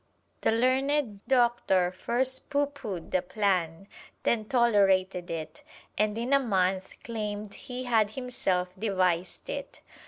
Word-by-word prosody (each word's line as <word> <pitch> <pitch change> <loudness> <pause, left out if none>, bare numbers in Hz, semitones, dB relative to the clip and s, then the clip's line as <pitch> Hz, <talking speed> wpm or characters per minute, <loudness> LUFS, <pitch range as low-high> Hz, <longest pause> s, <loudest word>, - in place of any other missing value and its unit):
The - - +3
learned 255 -2 +1
Doctor 235 -8 +3
first 255 +7 -1
pooh 285 0 +2
poohed 215 - -7
the 185 - +2
plan, 185 -3 -1 0.4
then 220 -2 +1
tolerated 195 -7 +3
it, 155 -1 -5 0.3
and 210 +1 +1
in 240 +4 -1
a 275 - +6
month 190 -6 0
claimed 210 -2 -4
he 255 -1 -6
had 225 -4 +3
himself 210 -7 -1
devised 185 -4 0
it. - - -6
210 Hz, 125 wpm, -28 LUFS, 185-245 Hz, 0.4 s, a